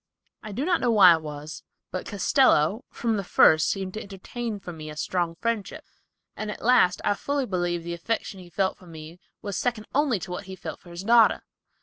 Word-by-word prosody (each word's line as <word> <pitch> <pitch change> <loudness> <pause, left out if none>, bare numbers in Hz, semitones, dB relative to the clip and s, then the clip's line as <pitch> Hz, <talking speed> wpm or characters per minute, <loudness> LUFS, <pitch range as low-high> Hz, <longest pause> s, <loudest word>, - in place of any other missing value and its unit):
I 215 - -8
know 245 +8 -3
not 320 -8 +2
why 195 -6 +8
it 160 - -1
was, 150 0 -8 0.3
but 185 - -5
Castello, 205 - +2
from 230 -2 -1
the 200 - -2
first 155 -3 +5
seemed 190 -2 -3
to 215 - -5
entertain 205 +3 -6
for 175 -2 -8
me 155 -1 -8
a 150 - -9
strong 170 +1 -1
friendship, 230 +1 -3 0.5
and 215 - -5
at 210 - -7
last 230 -7 +4
I - - +3
fully 280 +6 -2
believe 175 -4 -2
the 170 0 -4
affection 195 +2 -3
he 180 -1 -12
felt 190 +2 -1
for 185 - -16
me 160 +1 -11 0.2
was 200 -2 -3
second 230 -3 -2
only 275 -5 +2
to 170 - -7
what 190 +3 -5
he 190 0 -8
felt - - -7
for 175 - -16
his 170 +2 -7
daughter. 230 +1 +5
195 Hz, 210 wpm, -25 LUFS, 170-225 Hz, 0.5 s, why